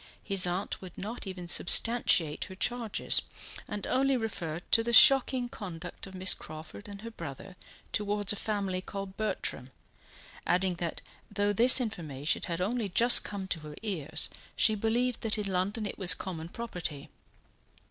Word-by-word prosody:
His 195 -3 +5
aunt 180 +3 -4
would 185 -2 -11
not 215 +2 -7
even 180 -2 -7
substantiate 175 -5 +3
her 190 - -11
charges, 235 +2 +1 0.5
and 205 -1 -5
only 270 +1 +1
referred 175 -8 -5
to 225 - +5
the 235 +1 -2
shocking 260 -1 +6
conduct 180 -6 -8
of 190 - -12
Miss 185 0 +4
Crawford 155 +7 -11
and 200 +1 -10
her 230 - -7
brother 170 0 -9 0.4
towards 205 -1 +1
a - - -5
family 200 -3 -3
called 195 0 -8
Bertram, 215 0 -4 0.8
adding 185 +1 +1
that 170 -2 -4 0.3
though 205 0 0
this 245 +6 +7
information 160 - -3
had 170 -1 -3
only 215 +2 -2
just 235 +6 +6
come 200 -2 -6
to 170 - -1
her 150 -1 -10
ears, 160 -7 -2 0.3
she 220 - +4
believed 230 +3 -1
that 220 -1 +1
in 210 - -2
London 195 +3 -2
it 205 - -6
was 185 -3 +5
common 165 -3 -7
property. 180 -10 -6
195 Hz, 160 wpm, -29 LUFS, 180-225 Hz, 0.8 s, this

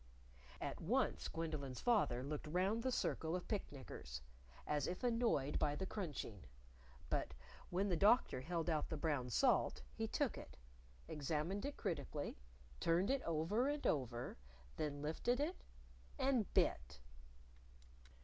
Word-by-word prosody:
At - - -4
once - - +1
Gwendolyn's 155 -6 -3
father 200 - +3
looked 150 +2 -3
round 190 +8 +2
the 260 +2 +1
circle 165 -8 0
of 180 - -4
picknickers 130 - -4 0.4
as 150 -2 +1
if 180 - -3
annoyed 230 - +2
by 145 -1 +2
the 190 - -2
crunching; 145 - -4 0.7
but - - 0 0.3
when 190 +3 +1
the 180 - +2
Doctor 205 - +5
held 165 +4 -1
out 155 -3 +1
the 160 - -2
brown 145 -5 0
salt, 85 - +3
he - - -2
took - - 0
it, - - -11 0.5
examined 155 - -1
it 285 - -5
critically, 165 -6 -2 0.4
turning 175 - +3
it 275 - -3
over 170 - +2
and 290 0 -1
over, 120 - 0 0.4
then 145 -2 -2
lifted 240 - +1
it 315 +6 -1 0.5
and 260 -7 +2
bit. 60 0 +2
165 Hz, 135 wpm, -40 LUFS, 145-205 Hz, 0.7 s, Doctor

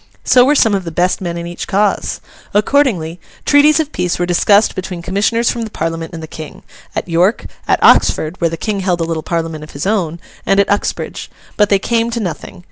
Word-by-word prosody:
So 250 - +5
were 285 +4 +3
some 225 -6 +4
of 195 -2 0
the 170 - -5
best 180 +4 0
men 170 -2 -3
in 170 - -5
each 175 0 -6
cause. 205 +1 0 0.3
Accordingly, 205 - +1 0.3
treaties 295 +2 +5
of 310 -2 -1
peace 180 -2 -1
were 175 - 0
discussed 200 +4 +3
between 180 -2 -6
commissioners 215 +6 +1
from 235 - -4
the 225 - -4
Parliament 165 -3 -4
and 165 -2 -8
the - - -7
King; 155 -1 -10 0.3
at - - -3
York, 180 +6 +1 0.2
at - - +3
Oxford 160 +4 +3
(where 170 - +2
the 165 - -5
King 205 +3 -2
held 185 -2 0
a - - 0
little 165 -1 -2
Parliament 165 -2 -3
of 155 - -12
his 145 - -3
own), 180 -6 -1 0.2
and 195 - +2
at 200 - +2
Uxbridge. 205 - -2 0.3
But 210 -1 +3
they 200 - +4
came 230 +3 0
to 235 0 -3
nothing. 180 -2 -5
185 Hz, 215 wpm, -16 LUFS, 165-215 Hz, 0.3 s, So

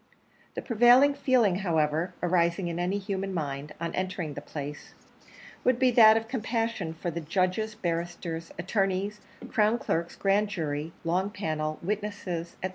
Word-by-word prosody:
The - - -4
prevailing 245 +4 +6
feeling, 240 -10 +2
however, 165 -1 0
arising 170 0 +2
in 170 0 -4
any 180 +3 0
human 195 -1 -3
mind, 145 -2 -4
on 170 0 -3
entering 185 -4 -3
the - - -6
place, 145 0 -7 0.7
would 255 -1 +3
be 255 0 +4
that 220 -2 +8
of 225 0 -3
compassion 225 -7 -2
for 170 +1 -3
the 170 +1 -4
judges, 185 +6 0
barristers, 170 -3 -3
attorneys, 195 +2 -1 0.3
crown 220 -1 +3
clerks, 170 -7 -2
grand 200 +2 +2
jury, 155 -3 -3
long 180 +4 0
panel, 155 -7 -3
witnesses, 195 -4 -3
&c. 185 - 0
185 Hz, 145 wpm, -28 LUFS, 165-210 Hz, 0.7 s, that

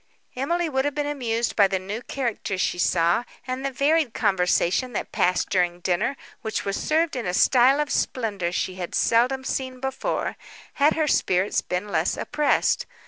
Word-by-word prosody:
Emily 340 +7 0
would 265 -3 0
have 290 0 -2
been 295 -1 -1
amused 240 -5 -1
by 200 -2 +5
the 190 0 -1
new 200 +5 -5
characters 235 -8 -3
she 175 - 0
saw, 175 +5 +2 0.2
and 255 +1 -4
the 275 - 0
varied 280 0 +1
conversation 190 +3 +1
that - - -4
passed 180 0 +1
during 175 -2 +1
dinner, 185 +10 0 0.2
which 220 -1 -3
was 200 0 -1
served 320 0 0
in 245 -6 -3
a 180 - -1
style 260 +6 +5
of 295 -1 -1
splendour 200 -8 -1
she 185 +1 -2
had 180 -2 -5
seldom 250 +3 +2
seen 260 -1 -3
before, 265 0 -3 0.4
had 295 +2 +5
her 315 -1 +1
spirits 190 -7 +1
been 180 +3 -3
less 165 -2 0
oppressed. 295 0 +1
240 Hz, 175 wpm, -24 LUFS, 185-275 Hz, 0.4 s, by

